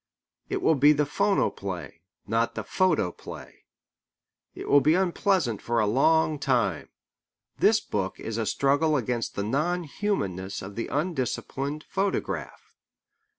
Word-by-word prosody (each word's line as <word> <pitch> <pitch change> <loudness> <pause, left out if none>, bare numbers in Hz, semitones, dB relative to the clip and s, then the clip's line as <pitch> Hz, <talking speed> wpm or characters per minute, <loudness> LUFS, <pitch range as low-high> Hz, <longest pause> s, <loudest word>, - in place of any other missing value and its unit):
It - - -2
will - - +5
be 145 +1 +6
the 150 0 +1
phonoplay, 100 - -1 0.2
not 115 +1 0
the - - -3
photoplay. 160 - -2 0.9
It - - -7
will 145 - +6
be 155 +5 +4
unpleasant 180 - +1
for 120 0 0
a 110 - +3
long 150 +7 +3
time. 120 - 0 0.7
This 220 +1 +5
book 95 - -3
is 110 0 -4
a 110 - -1
struggle 145 +7 +2
against 120 -2 -2
the 100 - -1
non 155 - 0
humanness 100 - -3
of 100 +1 -8
the 115 - -3
undisciplined 145 -1 -2
photograph. 195 +1 -3
140 Hz, 130 wpm, -26 LUFS, 110-160 Hz, 0.9 s, be